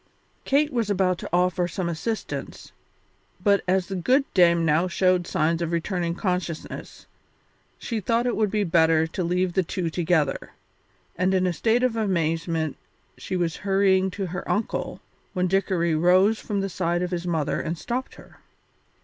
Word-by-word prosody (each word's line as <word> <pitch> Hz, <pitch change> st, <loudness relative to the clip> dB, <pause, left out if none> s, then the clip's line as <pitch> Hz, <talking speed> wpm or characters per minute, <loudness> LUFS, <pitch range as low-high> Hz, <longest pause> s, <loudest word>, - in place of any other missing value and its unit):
Kate 290 Hz, +2 st, +2 dB
was 230 Hz, -4 st, 0 dB
about 185 Hz, -3 st, +1 dB
to -, -, -7 dB
offer 180 Hz, 0 st, +2 dB
some 175 Hz, +1 st, -3 dB
assistance, 190 Hz, +7 st, -4 dB, 0.7 s
but 200 Hz, -1 st, +3 dB
as 185 Hz, 0 st, +2 dB
the 195 Hz, -, -5 dB
good 255 Hz, +10 st, +2 dB
Dame 170 Hz, -2 st, +4 dB
now 160 Hz, +3 st, +2 dB
showed 185 Hz, 0 st, +1 dB
signs 165 Hz, +2 st, 0 dB
of 170 Hz, -1 st, -2 dB
returning 170 Hz, 0 st, -1 dB
consciousness, 180 Hz, -4 st, -4 dB, 0.7 s
she 230 Hz, -2 st, -3 dB
thought 230 Hz, +4 st, 0 dB
it 245 Hz, -, 0 dB
would 215 Hz, -1 st, +1 dB
be 210 Hz, +1 st, 0 dB
better 160 Hz, -3 st, +3 dB
to 170 Hz, +3 st, -4 dB
leave 180 Hz, +1 st, 0 dB
the 190 Hz, -, +3 dB
two 175 Hz, -1 st, -3 dB
together, 160 Hz, -4 st, 0 dB, 0.6 s
and 185 Hz, +2 st, +1 dB
in 185 Hz, 0 st, +2 dB
a 180 Hz, -, +1 dB
state 230 Hz, +7 st, +1 dB
of 250 Hz, -3 st, +1 dB
amazement 165 Hz, -6 st, -1 dB, 0.4 s
she 185 Hz, -, -4 dB
was 170 Hz, -2 st, -1 dB
hurrying 195 Hz, -1 st, +2 dB
to 195 Hz, +1 st, -4 dB
her 180 Hz, +1 st, -6 dB
uncle 215 Hz, -, -2 dB, 0.3 s
when 180 Hz, 0 st, 0 dB
Dickory 180 Hz, -3 st, +1 dB
rose 185 Hz, +7 st, +4 dB
from 200 Hz, -2 st, -2 dB
the 195 Hz, -, -1 dB
side 175 Hz, -1 st, -1 dB
of 180 Hz, -, -3 dB
his 175 Hz, 0 st, -3 dB
mother 160 Hz, -4 st, -1 dB
and 165 Hz, +1 st, -3 dB
stopped 250 Hz, +8 st, -4 dB
her. -, -, -16 dB
180 Hz, 165 wpm, -24 LUFS, 170-195 Hz, 0.7 s, Dame